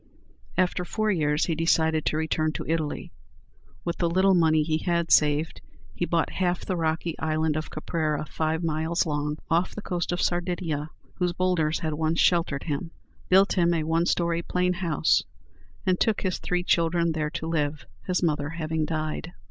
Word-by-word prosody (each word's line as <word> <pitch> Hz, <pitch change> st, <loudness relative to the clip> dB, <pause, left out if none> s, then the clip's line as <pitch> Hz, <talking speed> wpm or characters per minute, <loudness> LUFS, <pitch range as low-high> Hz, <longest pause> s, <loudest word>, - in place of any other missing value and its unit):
After 180 Hz, 0 st, +1 dB
four 215 Hz, +4 st, 0 dB
years 150 Hz, -4 st, +1 dB
he 165 Hz, -, 0 dB
decided 160 Hz, -1 st, +2 dB
to 155 Hz, -, 0 dB
return 155 Hz, 0 st, 0 dB
to -, -, -5 dB
Italy. 160 Hz, -2 st, -2 dB, 0.7 s
With 170 Hz, -, -2 dB
the 170 Hz, -, +2 dB
little 190 Hz, +3 st, +4 dB
money 160 Hz, -3 st, +4 dB
he 155 Hz, 0 st, 0 dB
had 170 Hz, -1 st, 0 dB
saved, 150 Hz, +1 st, +3 dB, 0.3 s
he 175 Hz, -, -1 dB
bought 170 Hz, -1 st, +1 dB
half 180 Hz, -1 st, -1 dB
the 185 Hz, -, -1 dB
rocky 165 Hz, 0 st, -1 dB
island 155 Hz, -1 st, 0 dB
of 155 Hz, 0 st, -3 dB
Caprera, 155 Hz, -1 st, -2 dB
five 160 Hz, +2 st, -2 dB
miles 160 Hz, +1 st, 0 dB
long, 150 Hz, -1 st, -2 dB
off 170 Hz, +2 st, +1 dB
the 210 Hz, -, -5 dB
coast 175 Hz, -1 st, -2 dB
of 175 Hz, -, -1 dB
Sardinia, 175 Hz, -4 st, -1 dB, 0.3 s
whose 180 Hz, -1 st, +1 dB
boulders 175 Hz, -4 st, +1 dB
had 160 Hz, -2 st, -1 dB
once 160 Hz, +2 st, 0 dB
sheltered 165 Hz, -6 st, +2 dB
him, 160 Hz, +2 st, -3 dB, 0.4 s
built 190 Hz, +2 st, +5 dB
him 170 Hz, -2 st, +3 dB
a 160 Hz, -, 0 dB
one 165 Hz, +2 st, +1 dB
story 170 Hz, -1 st, +1 dB
plain 180 Hz, +1 st, 0 dB
house, 170 Hz, -4 st, +2 dB, 0.6 s
and 185 Hz, -1 st, +2 dB
took 220 Hz, -2 st, +1 dB
his 185 Hz, -2 st, -1 dB
three 180 Hz, 0 st, -1 dB
children 170 Hz, -1 st, +2 dB
there 155 Hz, -1 st, -1 dB
to 160 Hz, 0 st, -5 dB
live, 150 Hz, -2 st, -1 dB, 0.2 s
his 180 Hz, 0 st, 0 dB
mother 150 Hz, -3 st, 0 dB
having 160 Hz, -1 st, -2 dB
died. 155 Hz, +1 st, -3 dB
165 Hz, 175 wpm, -26 LUFS, 155-175 Hz, 0.7 s, built